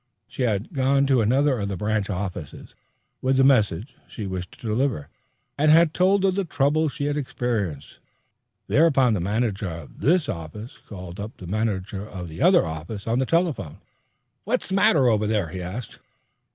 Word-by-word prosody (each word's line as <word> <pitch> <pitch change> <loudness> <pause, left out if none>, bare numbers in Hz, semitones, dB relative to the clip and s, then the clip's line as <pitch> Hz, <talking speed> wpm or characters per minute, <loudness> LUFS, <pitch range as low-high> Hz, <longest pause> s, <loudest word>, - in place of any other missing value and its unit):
She - - -7
had 110 - -1
gone 135 0 +2
to 135 -3 +3
another 130 +4 +2
of 100 - -2
the 100 -2 -3
branch 105 +1 -1
offices 90 -6 -5 0.5
with 130 +1 +1
the 135 - +5
message 110 - +2
she 105 - -7
wished 90 -2 -6
delivered, 115 - -1 0.5
and 155 +1 +4
had 160 0 +6
told 195 +2 +3
of 190 - +3
the 200 +1 0
trouble 155 -1 +1
she 145 - -4
had 145 0 -1
experienced. 110 - -3 0.7
Thereupon 140 -6 +4
the 105 - 0
manager 100 +1 -1
of 80 -3 -9
this 170 +2 +2
office 105 +4 -7
called 90 -3 -10
up 105 +3 -7
the 95 - -10
manager 100 0 -2
of 95 -5 -8
the 80 - -8
other - - +5
on 80 -1 -6 0.3
the 130 - 0
telephone. 165 - 0 0.7
"What's 240 +2 -1
the - - -3
matter 160 -8 +4
over 110 -2 +2
there?" 105 -6 0
he 90 +3 -6
asked. 95 +7 -7
110 Hz, 170 wpm, -24 LUFS, 95-140 Hz, 0.7 s, had